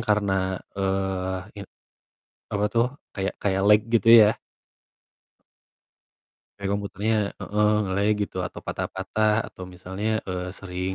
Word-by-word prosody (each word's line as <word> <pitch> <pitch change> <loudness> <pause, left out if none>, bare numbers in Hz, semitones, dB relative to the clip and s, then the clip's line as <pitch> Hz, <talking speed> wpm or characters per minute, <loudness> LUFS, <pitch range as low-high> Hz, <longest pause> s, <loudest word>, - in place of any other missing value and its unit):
karena, 95 -3 +1 0.2
eee, 95 -1 -1 0.2
ya 100 - -6 0.9
apa 100 0 +1
tuh 115 0 +3 0.3
kayak 95 -1 -2
kayak 95 -1 0
lag 105 0 +7
gitu 115 0 +2
ya. 110 -2 +8 2.2
Kayak 100 -1 -3
komputernya 100 +2 -1 0.3
heeh, 105 0 +1 0.2
nge-lag 100 +2 +1
gitu, 100 - -5
atau - - -9
patah-patah 105 +3 -1
atau - - -12
misalnya, 95 +4 -4 0.2
eee, 90 -1 -3
sering 90 0 -4
100 Hz, 115 wpm, -25 LUFS, 95-105 Hz, 2.2 s, ya